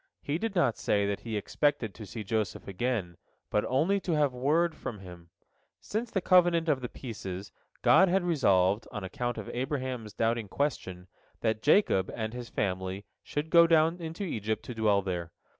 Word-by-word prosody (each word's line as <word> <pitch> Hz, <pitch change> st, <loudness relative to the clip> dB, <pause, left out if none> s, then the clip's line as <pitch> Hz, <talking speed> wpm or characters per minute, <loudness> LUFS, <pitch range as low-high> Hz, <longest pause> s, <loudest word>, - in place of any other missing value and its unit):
He 145 Hz, +3 st, -1 dB
did 225 Hz, -1 st, -3 dB
not 135 Hz, -10 st, +2 dB
say 100 Hz, -1 st, +1 dB
that 100 Hz, 0 st, -1 dB
he 110 Hz, -2 st, -4 dB
expected 115 Hz, -1 st, 0 dB
to 110 Hz, -3 st, -10 dB
see 110 Hz, +3 st, -6 dB
Joseph 105 Hz, -2 st, -2 dB
again, 100 Hz, -3 st, -2 dB, 0.3 s
but 105 Hz, -, +2 dB
only 165 Hz, +10 st, +2 dB
to 180 Hz, -3 st, -2 dB
have 145 Hz, -4 st, +2 dB
word 155 Hz, +7 st, +2 dB
from 115 Hz, -, -6 dB
him. 90 Hz, -3 st, -12 dB, 0.5 s
Since 225 Hz, +3 st, -3 dB
the 195 Hz, -, -1 dB
covenant 175 Hz, -2 st, +4 dB
of 145 Hz, -4 st, +2 dB
the 125 Hz, -, -4 dB
pieces, 100 Hz, -6 st, -7 dB, 0.3 s
God 190 Hz, -, +6 dB
had 190 Hz, +1 st, +2 dB
resolved, 100 Hz, -, +2 dB
on 105 Hz, -, -5 dB
account 120 Hz, +6 st, -3 dB
of 110 Hz, -, -6 dB
Abraham's 130 Hz, -4 st, -3 dB
doubting 115 Hz, 0 st, 0 dB
question, 95 Hz, -9 st, -3 dB, 0.3 s
that 110 Hz, -1 st, 0 dB
Jacob 145 Hz, -, +3 dB
and 110 Hz, -1 st, -3 dB
his 120 Hz, -1 st, -7 dB
family 95 Hz, 0 st, -2 dB, 0.2 s
should 150 Hz, +2 st, -4 dB
go 170 Hz, -1 st, +7 dB
down 165 Hz, +1 st, +3 dB
into 165 Hz, +4 st, -5 dB
Egypt 110 Hz, -, -3 dB
to 125 Hz, -, -5 dB
dwell 105 Hz, -3 st, +2 dB
there. 85 Hz, -3 st, -4 dB
120 Hz, 175 wpm, -29 LUFS, 100-160 Hz, 0.5 s, go